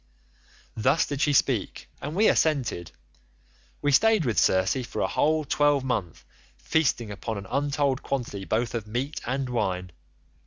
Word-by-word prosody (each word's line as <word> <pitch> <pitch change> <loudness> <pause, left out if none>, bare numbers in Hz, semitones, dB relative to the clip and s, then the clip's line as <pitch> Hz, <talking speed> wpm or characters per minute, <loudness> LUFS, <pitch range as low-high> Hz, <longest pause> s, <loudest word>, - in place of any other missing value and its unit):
"Thus 130 +8 +2
did 145 -1 -4
she 150 - +3
speak 130 -6 0
and 150 - -5
we 215 +3 +4
assented. 130 - +1 0.9
We 145 - +2
stayed 215 +3 +4
with 115 -4 +1
Circe 95 +8 +2
for 120 - -6
a - - +1
whole 155 0 +1
twelvemonth 135 - 0 0.3
feasting 130 -8 0
upon 110 +2 -5
an 100 - -7
untold 140 +3 0
quantity 120 -7 -3
both 115 +4 -1
of 115 -3 -4
meat 130 +7 -3
and 135 +1 -1
wine. 90 -7 -2
130 Hz, 145 wpm, -26 LUFS, 110-145 Hz, 0.9 s, we